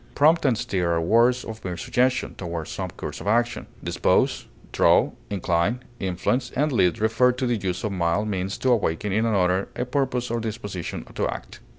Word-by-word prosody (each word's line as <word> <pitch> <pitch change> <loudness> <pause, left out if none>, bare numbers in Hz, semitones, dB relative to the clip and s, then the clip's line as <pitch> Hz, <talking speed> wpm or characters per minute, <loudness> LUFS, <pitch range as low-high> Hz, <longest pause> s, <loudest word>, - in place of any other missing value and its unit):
Prompt 160 +3 +4
and 125 -5 +3
stir 90 -5 0
are 85 - +1
words 115 +8 +3
of 110 -1 -8
mere 90 -2 -4
suggestion 125 +6 0
toward 85 -3 -5
some - - -4
course - - -7
of - - -7
action; 120 +3 +1 0.2
dispose, - - +1 0.2
draw, - - +4 0.2
incline, 95 +5 0 0.2
influence, 95 +8 -1
and 150 +3 +1
lead 90 -9 +3
refer 115 +4 +3
to 130 +1 -3
the 120 -1 +1
use 95 -2 -3
of 110 - -1
mild 90 +3 0
means 95 -1 -2
to 130 - +1
awaken 105 -4 0
in 110 +2 +2
another 95 -3 +2
a 125 - -2
purpose 125 -2 -1
or 120 - 0
disposition 105 -5 -5
to - - 0
act. - - -7
110 Hz, 185 wpm, -24 LUFS, 90-125 Hz, 0.2 s, Prompt